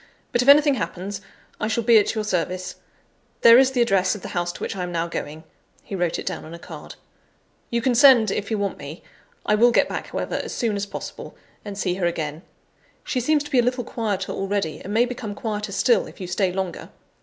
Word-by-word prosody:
But 240 - +2
if 250 - -2
anything 290 0 +7
happens, 200 -4 -4 0.4
I 215 - -1
shall 225 +1 -1
be 225 0 +6
at 210 - -1
your 215 - -1
service. 185 -2 -2 0.6
There 235 +1 +9
is 265 0 +5
the 250 -2 +2
address 195 -3 +2
of 210 - -10
the - - -6
house 175 -1 -2
to - - -12
which - - -3
I 190 - -4
am 180 0 -3
now 170 -1 -1
going" 155 -1 -6 0.4
(he - - -10
wrote 175 -3 0
it - - -6
down - - -4
on 160 +2 -9
a - - -9
card); - - -10 0.7
"you 235 -1 -1
can 255 - +2
send, 240 -5 +6
if 205 - -3
you 220 - 0
want 200 -1 -2
me. 145 +4 -9 0.4
I - - +2
will 230 +3 +5
get - - +3
back, - - -5
however, - - -3
as - - -6
soon 225 -3 0
as 200 0 -3
possible, - - -8 0.3
and 205 -2 -7
see 185 -3 0
her 180 -1 0
again; 155 -2 -3 0.6
she 255 - -2
seems 295 +4 +2
to 295 - -11
be 260 - +4
a - - +4
little 250 +1 0
quieter 210 -4 -3
already, 195 -4 -2
and 200 - -8
may 230 +3 +3
become 240 -4 -6
quieter 210 -2 -4
still, 240 +4 +2
if - - -14
you 185 - -5
stay 180 +1 0
longer. 185 -2 -4
205 Hz, 235 wpm, -23 LUFS, 180-235 Hz, 0.7 s, There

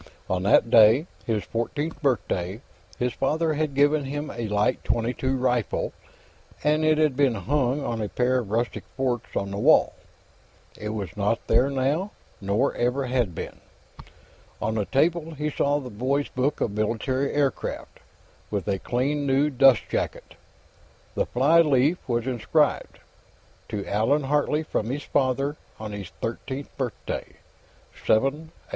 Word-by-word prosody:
On 95 -1 -1
that 100 +4 +4
day, 115 +6 +7 0.2
his 110 -3 0
fourteenth 145 +9 -3
birthday, 105 - -1 0.4
his 125 0 -1
father 155 +3 0
had 150 -2 -2
given 145 +1 +3
him 145 +2 -4
a 115 -1 -4
light 105 +5 +1
.22 125 +3 -1
rifle, 125 -3 0 0.7
and 150 +1 +2
it 155 0 +4
had 155 -4 +2
been 135 -4 +3
hung 135 +6 0
on 115 -3 -2
a 105 - -2
pair 125 +1 +1
of 115 -5 -6
rustic 115 +3 -1
forks 125 -3 -2
on 100 0 -2
the 100 - -4
wall. - - +5 0.8
It 105 - -5
was 100 -6 -5
not 105 +3 0
there 135 - +3
now, 140 +8 0 0.3
nor 100 +7 +1
ever 125 +3 0
had 120 -8 0
been. - - -6 1.0
On 110 - -1
the 105 -2 -1
table, 160 - +1
he 150 +1 -2
saw 145 0 +1
a 140 -3 -6
boys' 130 +6 -1
book 135 +4 -1
of 110 - +1
military 115 +6 -1
aircraft, 140 -3 -2 0.5
with 100 -2 -3
a 100 -2 0
clean, 140 +6 -1
new 140 +3 +2
dustjacket; 135 -2 +2 0.8
the - - 0
flyleaf 150 +2 +4
was 120 -1 0
inscribed: 125 -4 0 0.7
_To 100 -2 -4
Allan 115 +9 +1
Hartley, 150 +2 +1
from 110 -7 -2
his 145 +3 -3
father, 135 +2 0 0.2
on 110 -1 -6
his 100 -3 -6
thirteenth 130 +4 -5
birthday, 125 -5 -4 0.6
7/18 - - -18 0.2
'45. 150 +4 -3
130 Hz, 145 wpm, -25 LUFS, 110-145 Hz, 1.0 s, day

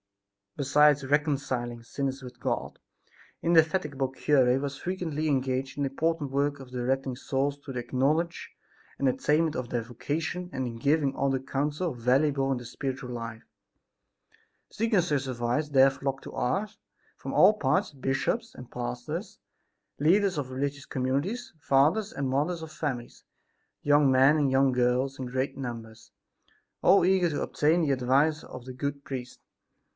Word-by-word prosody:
Besides 145 0 +4
reconciling 135 -5 -1
sinners 135 +2 -3
with 125 -1 -10
God - - -3 0.6
the - - -5
indefatigable 155 -5 +2
cure 130 -1 +3
was 140 0 -3
frequently 160 -3 -3
engaged 130 -1 -1
in 145 - 0
the 135 - 0
important 160 0 -1
work 140 +1 0
of 130 -2 -11
directing 130 +1 -1
souls 140 +2 -1
to 140 - -9
the 120 -2 -4
knowledge 155 +6 0 0.5
and 140 - +1
attainment 155 +4 +1
of 125 -2 -4
their 120 -2 -1
vocation 155 +9 -4
and 130 - -2
in 115 -2 -5
giving 140 +2 +1
other 135 -1 +1
counsel 145 +5 -2
valuable 135 +3 +2
in 135 - +1
their 120 - -8
spiritual 130 +1 -5
life. 115 -2 -6 1.3
Seeking 225 -2 +1
such 145 -5 -1
advice 125 +4 -1
there 135 -1 +6
flocked 135 0 -4
to - - -9
Ars, 205 - -2 0.4
from - - -7
all 195 +3 +7
parts, 145 -7 0
bishops 135 - -2
and 125 - -11
pastors, 125 - -5 0.6
leaders 185 +4 +3
of 140 -3 -3
religious 140 +2 -3
communities, 140 - -2
fathers 150 +9 +2
and 140 -1 -3
mothers 155 +6 -1
of 160 - -8
families, 140 -6 -5 0.6
young 145 -1 +4
men 135 +3 +6
and 145 -3 +2
young 135 0 +4
girls 125 +2 +1
in 130 - -4
great 130 +2 -2
numbers, 115 -4 -7 0.7
all 195 - +5
eager 185 -2 +3
to 150 - -2
obtain 160 +4 +2
the 145 - +1
advice 135 +5 +2
of 120 - -10
the 130 - -7
good 140 +2 -4
priest. 125 -2 -6
140 Hz, 150 wpm, -28 LUFS, 130-150 Hz, 1.3 s, all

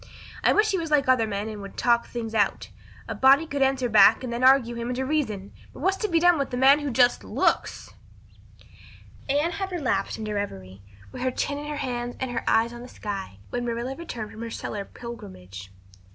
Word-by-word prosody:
I - - +5
wish 430 0 +3
he 380 - 0
was 325 -1 -4
like 295 -3 +2
other 255 -4 +3
men 205 0 -3
and 215 -2 -6
would 200 - -10
talk 235 -1 +2
things 230 -2 -5
out. 205 -3 0 0.4
A - - -3
body 275 +4 +5
could 285 -3 -4
answer 265 -2 +2
back 215 0 +6
then 250 -2 -4
and 240 +2 -3
argue 260 -2 +5
him 235 0 -4
into 255 +1 -2
reason. 220 -10 -2 0.2
But - - -12
what's 380 +4 +2
to 425 - -1
be 335 -4 +2
done 350 -2 +4
with 275 - -2
a 245 - -2
man 270 +3 +6
who 290 -1 -3
just 245 -1 +3
looks?" - - -1 1.4
Anne 295 +5 +1
had 385 +3 -4
relapsed 255 - -1
into 215 -1 -4
reverie, 95 - -5 0.3
with 255 - -8
her 255 - +1
chin 285 +3 -2
in 295 - -7
her 300 - -4
hands 245 -3 -3
and 260 -1 -3
her 235 - -3
eyes 230 +1 +3
on 240 - -9
the 245 - -9
sky, 195 - -6
when 245 - -2
Marilla 240 +2 -3
returned 245 -10 -7
from 220 - -10
her 230 - -5
cellar 205 -2 -5
pilgrimage. 95 - -10
245 Hz, 215 wpm, -25 LUFS, 215-280 Hz, 1.4 s, back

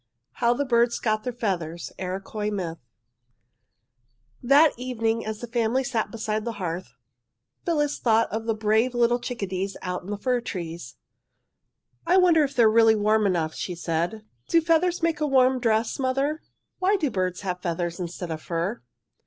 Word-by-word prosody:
HOW 235 0 +3
THE 285 - -1
BIRDS 235 -1 +2
GOT 215 -1 0
THEIR 250 - -3
FEATHERS 175 -8 -3
(IROQUOIS 195 +3 -3
MYTH) 175 -5 -4 1.6
That 285 +5 +5
evening, 230 -2 -1
as 215 -1 -5
the 240 - -5
family 235 +2 +1
sat 235 -5 -1
beside 215 -1 -3
the 235 - -3
hearth, 175 - -5 0.7
Phyllis 295 -4 +1
thought 225 -1 +3
of 225 +2 -3
the 225 - +1
brave 220 +3 +1
little 240 0 +3
chickadees 195 -6 -4
out 180 -1 -3
in 180 - -11
the 205 - -2
fir 250 +3 0
trees. 170 - -6 1.1
"I 365 - +5
wonder 345 -4 +5
if 280 -1 -3
they 240 - +5
are 220 - +6
really 225 0 +6
warm 215 0 +2
enough," 165 -4 0
she 180 - -4
said. 170 +6 -2 0.2
"Do 335 - +5
feathers 330 +1 +1
make 325 -2 +1
a 300 - +2
warm 260 -1 +4
dress, 225 0 +1
mother? 275 +4 0 0.4
Why 380 +2 +3
do 305 -9 0
birds 185 -3 -2
have 180 -2 -3
feathers 170 0 -2
instead 175 -1 -5
of 155 -1 -4
fur?" 175 +8 -3
220 Hz, 170 wpm, -25 LUFS, 185-255 Hz, 1.6 s, are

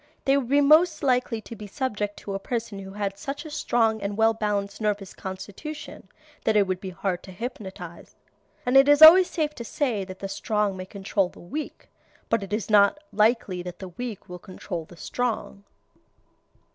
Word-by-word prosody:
They 275 - +4
would 265 -4 -1
be 285 +1 +4
most 310 +3 +5
likely 250 -4 +1
to 230 - -10
be 210 -2 -9
subject 205 -3 -3
to 200 - -6
a 195 - -2
person 225 -1 -4
who 195 0 -9
had 200 -1 -3
such 280 +7 -5
a 310 - -8
strong 225 -6 +1
and 200 +1 -3
well 225 0 +4
balanced 205 -2 -2
nervous 205 -2 -2
constitution 205 +11 -8 0.3
that 220 - +2
it 205 -1 +5
would 185 -1 -3
be 190 - -5
hard 180 0 -3
to 190 - -12
hypnotize. 190 -5 -8 0.5
And 250 +2 +1
it 270 +1 +7
is 290 +1 +7
always 355 +3 +10
safe 305 -3 -1
to 240 - -7
say 230 -3 -1
that 185 0 -9
the 195 - -5
strong 210 0 -1
may 185 0 -7
control 195 -1 -1
the - - -17
weak, 295 - -7 0.4
but 230 -1 +2
it 195 - -8
is 210 0 -2
not 205 +3 +5 0.2
likely 210 -4 +2
that 175 0 -8
the 190 - -8
weak 225 +3 -7
will 180 0 -8
control 175 -2 -7
the 175 - -16
strong. 220 0 -3
210 Hz, 195 wpm, -25 LUFS, 195-250 Hz, 0.5 s, always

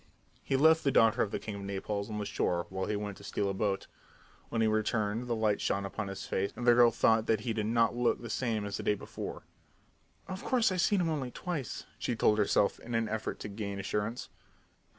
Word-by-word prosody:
He - - 0
left 160 +3 +5
the 140 - +3
daughter 115 -2 +4
of 105 - +1
the - - -2
king 105 - -6
of 100 - -6
Naples 100 +1 -3
on 105 - -4
the 105 - -2
shore 85 -3 0
while 95 0 -3
he 105 - 0
went 100 -1 -4
to 100 - -14
steal 100 0 -1
a - - -1
boat. 95 0 -1 0.6
When 115 - -2
he - - +4
returned 110 +1 0
the 120 - 0
light 110 -2 +1
shone 100 0 0
upon 100 0 -4
his 100 -1 -6
face 95 +1 -1
and 120 - -5
the 120 - +7
girl 120 0 +7
thought 110 -1 +3
that 110 -2 +2
he 115 0 -2
did 105 -1 -1
not 115 +1 +2
look 120 0 +1
the 115 - -7
same 115 -2 -1
as 100 0 -3
the - - -4
day 105 - +2
before. - - -7 0.8
"Of 190 0 -6
course, 240 -5 +2
I've 185 -1 +1
seen 200 +1 +3
him 165 - +1
only 140 -5 -2
twice," 150 -2 -4
she 120 - -1
told 110 -1 +3
herself 100 0 +2
in 120 0 -5
an 115 -1 +1
effort 110 0 -3
to - - -4
gain 100 -1 -5
assurance. 105 +4 -3
110 Hz, 235 wpm, -31 LUFS, 100-120 Hz, 0.8 s, the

